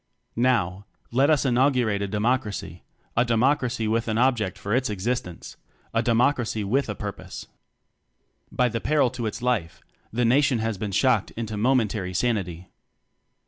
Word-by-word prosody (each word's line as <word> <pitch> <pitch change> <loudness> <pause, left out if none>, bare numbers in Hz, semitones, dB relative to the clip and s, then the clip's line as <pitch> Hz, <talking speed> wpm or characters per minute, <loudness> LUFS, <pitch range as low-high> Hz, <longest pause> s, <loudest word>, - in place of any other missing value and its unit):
Now, 105 -6 +1 0.2
let 135 +5 +3
us 150 -2 +3
inaugurate 125 -5 +2
a 100 - -1
Demo 105 +5 +2
cracy 100 -7 -7 0.3
a 120 - +4
Democracy 120 -1 +1
with 115 +1 0
an 110 -1 0
object 115 -6 +1
for 100 +1 -3
its 130 0 +1
existence 105 -3 -4 0.4
a 115 - +2
Democracy 120 -1 +1
with 125 +6 0
a 105 - -3
Purpose. 105 0 -7 1.1
By 125 - +2
the 115 -1 -3
peril 145 -4 +2
to 120 -3 -3
its 110 - -5
life, 115 -10 -1 0.3
the 120 +2 0
Nation 135 +2 +3
has 110 -3 -2
been 105 -1 -3
shocked 120 0 +2
into 110 -2 -4
momentary 105 -5 0
sanity. 95 -6 -1
115 Hz, 150 wpm, -25 LUFS, 105-125 Hz, 1.1 s, a